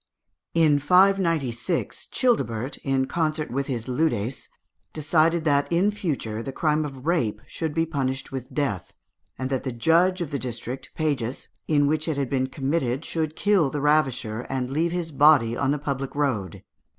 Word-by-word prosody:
In 155 Hz, -3 st, +4 dB
596, 165 Hz, -4 st, +2 dB
Childebert, 135 Hz, -, 0 dB
in 135 Hz, -1 st, 0 dB
concert 155 Hz, 0 st, -1 dB
with 135 Hz, +2 st, -2 dB
his 120 Hz, -3 st, -3 dB
leudes, 125 Hz, -3 st, -1 dB, 0.4 s
decided 160 Hz, +2 st, +2 dB
that 145 Hz, 0 st, +2 dB
in 180 Hz, +5 st, +3 dB
future 140 Hz, -, -3 dB
the 135 Hz, -, -5 dB
crime 150 Hz, +2 st, +1 dB
of 135 Hz, -2 st, -8 dB
rape 125 Hz, -12 st, +1 dB
should 160 Hz, -2 st, -4 dB
be 165 Hz, 0 st, +2 dB
punished 135 Hz, -4 st, -3 dB
with 130 Hz, -2 st, -6 dB
death, 135 Hz, -, -2 dB, 0.4 s
and 130 Hz, +1 st, -3 dB
that 130 Hz, -, 0 dB
the 130 Hz, -, -3 dB
judge 170 Hz, +10 st, +3 dB
of 165 Hz, -4 st, -4 dB
the 140 Hz, -, -2 dB
district 125 Hz, +1 st, -5 dB
(pagus) 140 Hz, -6 st, -2 dB, 0.2 s
in 145 Hz, -2 st, +3 dB
which 155 Hz, +2 st, 0 dB
it 155 Hz, -3 st, -1 dB
had 140 Hz, -3 st, -2 dB
been 130 Hz, -1 st, +1 dB
committed 135 Hz, 0 st, -1 dB
should 160 Hz, -1 st, -2 dB
kill 200 Hz, -8 st, +3 dB
the 145 Hz, -, -3 dB
ravisher, 135 Hz, -7 st, +1 dB
and 130 Hz, -1 st, -2 dB
leave 165 Hz, +4 st, +1 dB
his 175 Hz, -2 st, -3 dB
body 140 Hz, -5 st, +5 dB
on 135 Hz, +2 st, 0 dB
the 145 Hz, -, +2 dB
public 140 Hz, -2 st, -4 dB
road. 115 Hz, -, -1 dB
145 Hz, 165 wpm, -25 LUFS, 130-160 Hz, 0.4 s, body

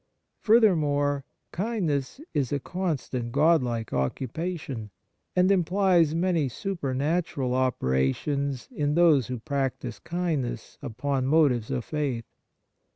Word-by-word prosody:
Furthermore, 145 Hz, -, +3 dB, 0.3 s
kindness 180 Hz, -, -2 dB
is 135 Hz, -4 st, 0 dB
a 145 Hz, -, 0 dB
con 180 Hz, +2 st, -2 dB
stant 120 Hz, -2 st, -5 dB
godlike 130 Hz, -6 st, +2 dB
occupation, 130 Hz, -, -3 dB, 0.5 s
and 180 Hz, +1 st, +4 dB
implies 180 Hz, -3 st, +3 dB
many 170 Hz, -5 st, +1 dB
supernatural 145 Hz, -, -1 dB
operations 130 Hz, -, 0 dB
in 150 Hz, -, -1 dB
those 160 Hz, -8 st, +5 dB
who 125 Hz, -, -3 dB
prac 135 Hz, +1 st, -2 dB
tise 115 Hz, -4 st, -7 dB
kindness 150 Hz, -10 st, -3 dB
upon 135 Hz, +1 st, -2 dB
motives 135 Hz, -7 st, +3 dB
of 120 Hz, -, -2 dB
faith. 140 Hz, -7 st, -2 dB
145 Hz, 105 wpm, -27 LUFS, 125-170 Hz, 0.5 s, those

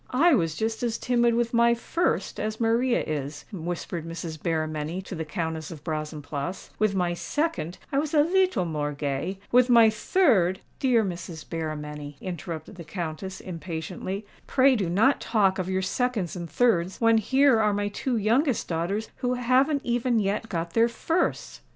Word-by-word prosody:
"I 335 Hz, +4 st, +6 dB
was 165 Hz, -, +1 dB
just 220 Hz, +3 st, -2 dB
as 235 Hz, -2 st, -1 dB
timid 240 Hz, -2 st, +2 dB
with 235 Hz, 0 st, 0 dB
my 235 Hz, 0 st, +5 dB
first 285 Hz, -, -1 dB
as 215 Hz, +1 st, -3 dB
Maria 235 Hz, +2 st, +2 dB
is," 145 Hz, -1 st, -4 dB
whispered 170 Hz, -1 st, -4 dB
Mrs. 165 Hz, -2 st, -6 dB
Berrymenny 155 Hz, 0 st, -2 dB
to 195 Hz, -, -8 dB
the 160 Hz, -2 st, -3 dB
Countess 160 Hz, -1 st, -4 dB
of 155 Hz, -4 st, -9 dB
Brazenphace: 155 Hz, +1 st, -4 dB
"with 215 Hz, -2 st, +2 dB
my 175 Hz, -2 st, +1 dB
second 290 Hz, -, -2 dB
I 275 Hz, -, +2 dB
was 300 Hz, +1 st, -2 dB
a 295 Hz, -, +6 dB
leetle 370 Hz, -, +2 dB
more 150 Hz, -3 st, -2 dB
gay;—with 190 Hz, -, 0 dB
my 230 Hz, -2 st, +7 dB
third——" 215 Hz, -, +2 dB, 0.2 s
"Dear 245 Hz, -4 st, +3 dB
Mrs. 170 Hz, -3 st, -6 dB
Berrymenny," 150 Hz, -3 st, -5 dB
interrupted 170 Hz, 0 st, -6 dB
the 170 Hz, -, -7 dB
Countess, 175 Hz, +3 st, -5 dB
impatiently; 180 Hz, +3 st, -5 dB, 0.2 s
"pray 265 Hz, 0 st, +4 dB
do 195 Hz, -7 st, -1 dB
not 220 Hz, +11 st, +3 dB
talk 195 Hz, -4 st, +2 dB
of 185 Hz, 0 st, -2 dB
your 190 Hz, 0 st, 0 dB
seconds 215 Hz, -3 st, -1 dB
and 170 Hz, -2 st, -6 dB
thirds, 185 Hz, -2 st, +1 dB
when 230 Hz, -1 st, +5 dB
here 265 Hz, +2 st, +4 dB
are 210 Hz, -1 st, +3 dB
my 205 Hz, 0 st, -1 dB
two 240 Hz, +4 st, -2 dB
youngest 235 Hz, +5 st, +1 dB
daughters 180 Hz, +6 st, -2 dB
who 250 Hz, 0 st, 0 dB
haven't 260 Hz, +4 st, +2 dB
even 240 Hz, 0 st, +1 dB
yet 210 Hz, +2 st, -1 dB
got 170 Hz, -1 st, -3 dB
their 230 Hz, +1 st, +4 dB
firsts." 330 Hz, +9 st, -1 dB
195 Hz, 165 wpm, -26 LUFS, 165-240 Hz, 0.2 s, my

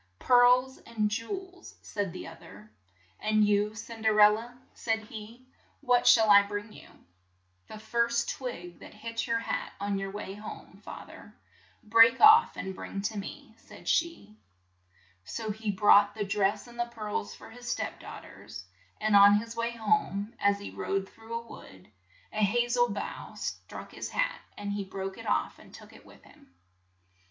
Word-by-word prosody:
"Pearls 250 Hz, -, +4 dB
and 215 Hz, -2 st, -2 dB
jew 230 Hz, +1 st, -3 dB
els," 375 Hz, -1 st, -8 dB
said 200 Hz, -3 st, -3 dB
the 185 Hz, -, -8 dB
oth 165 Hz, 0 st, -12 dB
er. 105 Hz, +3 st, -14 dB, 0.5 s
"And 215 Hz, 0 st, +2 dB
you, 205 Hz, +1 st, +1 dB
Cin 225 Hz, +1 st, -9 dB
.der 220 Hz, -1 st, +2 dB
el 210 Hz, 0 st, +8 dB
la, 230 Hz, +3 st, -5 dB
" -, -, -35 dB
said 225 Hz, -1 st, +1 dB
he, 220 Hz, +3 st, -11 dB, 0.4 s
"what 245 Hz, -1 st, +2 dB
shall 220 Hz, -2 st, +6 dB
I 200 Hz, 0 st, +9 dB
bring 205 Hz, +1 st, -6 dB
you?" -, -, -14 dB, 0.8 s
"The -, -, -9 dB
first 235 Hz, +2 st, 0 dB
twig 180 Hz, -10 st, -7 dB
that -, -, -13 dB
hits 230 Hz, +2 st, -4 dB
your 230 Hz, 0 st, +1 dB
hat 230 Hz, -, -3 dB
on 200 Hz, 0 st, -1 dB
your 195 Hz, 0 st, -4 dB
way 195 Hz, -1 st, -6 dB
home, 210 Hz, +1 st, -10 dB
fa -, -, -8 dB
ther, -, -, -14 dB, 0.5 s
break 230 Hz, +2 st, +6 dB
off 440 Hz, +2 st, +7 dB
and 190 Hz, -, -4 dB
bring 195 Hz, +1 st, -6 dB
to 215 Hz, +1 st, -2 dB
me," 200 Hz, -, -9 dB
said -, -, -15 dB
she. 325 Hz, -11 st, -1 dB, 0.8 s
So 150 Hz, -, -4 dB
he 215 Hz, +1 st, -5 dB
brought 205 Hz, +1 st, +5 dB
the 210 Hz, -2 st, -2 dB
dress 195 Hz, 0 st, 0 dB
and 240 Hz, -1 st, -14 dB
the 240 Hz, -, +1 dB
pearls 210 Hz, -, -4 dB
for 225 Hz, -, -13 dB
his 245 Hz, +1 st, -9 dB
step -, -, -3 dB
daugh -, -, -10 dB
ters, 95 Hz, -, -11 dB, 0.3 s
and 215 Hz, -1 st, +2 dB
on 200 Hz, 0 st, +8 dB
his 230 Hz, +2 st, -3 dB
way 230 Hz, 0 st, -1 dB
home, 215 Hz, -1 st, 0 dB
as 200 Hz, 0 st, +3 dB
he 200 Hz, -, -8 dB
rode 195 Hz, 0 st, -2 dB
through 225 Hz, +1 st, -9 dB
a 235 Hz, -, -13 dB
wood, 95 Hz, -, -13 dB, 0.4 s
a 215 Hz, -, 0 dB
ha 240 Hz, +4 st, +2 dB
zel 240 Hz, 0 st, +2 dB
bough 200 Hz, -1 st, -6 dB
struck -, -, -7 dB
his -, -, -6 dB
hat, -, -, -1 dB, 0.2 s
and 205 Hz, 0 st, -4 dB
he 205 Hz, 0 st, -3 dB
broke 190 Hz, 0 st, -6 dB
it -, -, -9 dB
off -, -, -1 dB
and -, -, -16 dB
took -, -, -14 dB
it -, -, -17 dB
with -, -, -18 dB
him. 90 Hz, -, -21 dB
215 Hz, 185 wpm, -29 LUFS, 200-235 Hz, 0.8 s, I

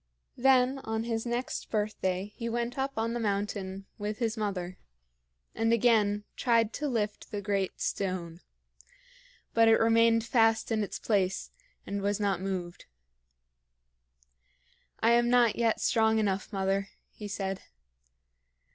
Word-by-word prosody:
Then 260 Hz, +1 st, +4 dB
on 220 Hz, -3 st, -3 dB
his 230 Hz, 0 st, -2 dB
next 240 Hz, +2 st, -3 dB
birthday 205 Hz, -2 st, -2 dB
he 235 Hz, -1 st, -4 dB
went 235 Hz, +1 st, -2 dB
up 270 Hz, 0 st, -2 dB
on 225 Hz, +1 st, 0 dB
the 240 Hz, -, -2 dB
mountain 200 Hz, -2 st, -2 dB
with 210 Hz, +1 st, -3 dB
his 230 Hz, -2 st, -1 dB
mother, 190 Hz, -5 st, -3 dB, 0.7 s
and 225 Hz, +1 st, +1 dB
again 215 Hz, -3 st, +3 dB
tried 230 Hz, -3 st, +2 dB
to 300 Hz, -, -2 dB
lift 215 Hz, -5 st, -2 dB
the 205 Hz, -, -4 dB
great 200 Hz, -1 st, -2 dB
stone. 180 Hz, -3 st, -3 dB, 1.1 s
But 230 Hz, 0 st, +5 dB
it 225 Hz, -, +7 dB
remained 230 Hz, 0 st, +4 dB
fast 225 Hz, -1 st, +2 dB
in 220 Hz, -1 st, +1 dB
its 205 Hz, -, -5 dB
place 195 Hz, -3 st, 0 dB, 0.3 s
and 200 Hz, 0 st, -3 dB
was 200 Hz, +1 st, 0 dB
not 200 Hz, -3 st, 0 dB
moved. 185 Hz, -2 st, -4 dB, 2.2 s
"I 230 Hz, -, +4 dB
am 240 Hz, 0 st, +4 dB
not 240 Hz, -3 st, +4 dB
yet 230 Hz, -2 st, +1 dB
strong 220 Hz, -1 st, +3 dB
enough, 200 Hz, -2 st, -1 dB
mother," 195 Hz, 0 st, 0 dB, 0.2 s
he 210 Hz, -, -8 dB
said. 195 Hz, -1 st, -3 dB
215 Hz, 135 wpm, -29 LUFS, 195-230 Hz, 2.2 s, it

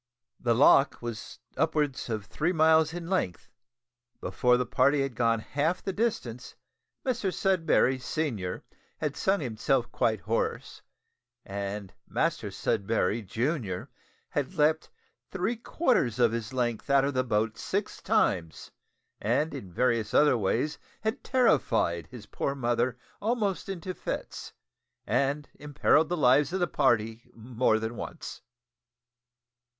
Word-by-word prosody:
The 120 Hz, -2 st, +1 dB
loch 135 Hz, +1 st, +5 dB
was 115 Hz, -2 st, -6 dB, 0.2 s
upwards 150 Hz, -4 st, 0 dB
of 110 Hz, -3 st, -3 dB
three 150 Hz, -, -1 dB
miles 160 Hz, -1 st, +4 dB
in 170 Hz, 0 st, -6 dB
length; 170 Hz, -, -2 dB, 0.7 s
before 125 Hz, 0 st, +2 dB
the 125 Hz, -, 0 dB
party 140 Hz, +3 st, +3 dB
had 135 Hz, -2 st, -3 dB
gone 115 Hz, 0 st, +2 dB
half 155 Hz, +9 st, -1 dB
the 195 Hz, -, -2 dB
distance 130 Hz, -, -2 dB, 0.5 s
Mr 240 Hz, -7 st, 0 dB
Sudberry 165 Hz, -9 st, +2 dB
senior 120 Hz, -, -3 dB, 0.3 s
had 150 Hz, -2 st, -2 dB
sung 195 Hz, +1 st, +1 dB
himself 120 Hz, 0 st, 0 dB
quite 110 Hz, -4 st, 0 dB
hoarse, -, -, -2 dB, 0.6 s
and 100 Hz, 0 st, -5 dB
Master -, -, -1 dB
Sudberry 105 Hz, +1 st, 0 dB
junior 110 Hz, -, -2 dB, 0.4 s
had 145 Hz, +5 st, -2 dB
leaped 155 Hz, 0 st, +2 dB, 0.4 s
three 195 Hz, +5 st, -1 dB
quarters 225 Hz, -, +1 dB
of 120 Hz, -3 st, +4 dB
his 115 Hz, +1 st, -4 dB
length 120 Hz, -1 st, -2 dB
out 140 Hz, -1 st, +5 dB
of 140 Hz, -, -1 dB
the 130 Hz, 0 st, +1 dB
boat 110 Hz, -2 st, 0 dB
six 200 Hz, +2 st, -3 dB
times, 95 Hz, -, 0 dB, 0.5 s
and 130 Hz, +9 st, 0 dB
in 120 Hz, -10 st, -7 dB
various 115 Hz, +1 st, 0 dB
other 150 Hz, -3 st, +5 dB
ways 120 Hz, +7 st, 0 dB, 0.2 s
had 220 Hz, +5 st, -2 dB
terrified 120 Hz, -, +2 dB
his 110 Hz, +3 st, -11 dB
poor 140 Hz, +6 st, -3 dB
mother 120 Hz, -1 st, 0 dB, 0.2 s
almost 210 Hz, -4 st, -1 dB
into 185 Hz, -1 st, -4 dB
fits, -, -, -5 dB, 0.5 s
and 145 Hz, +2 st, 0 dB
imperilled 150 Hz, +1 st, +2 dB
the 175 Hz, -, -1 dB
lives 140 Hz, +1 st, +4 dB
of 190 Hz, -, 0 dB
the 175 Hz, -, +3 dB
party 115 Hz, -6 st, 0 dB
more 115 Hz, 0 st, +1 dB
than 110 Hz, +1 st, -4 dB
once. -, -, -7 dB
130 Hz, 130 wpm, -28 LUFS, 115-160 Hz, 0.7 s, loch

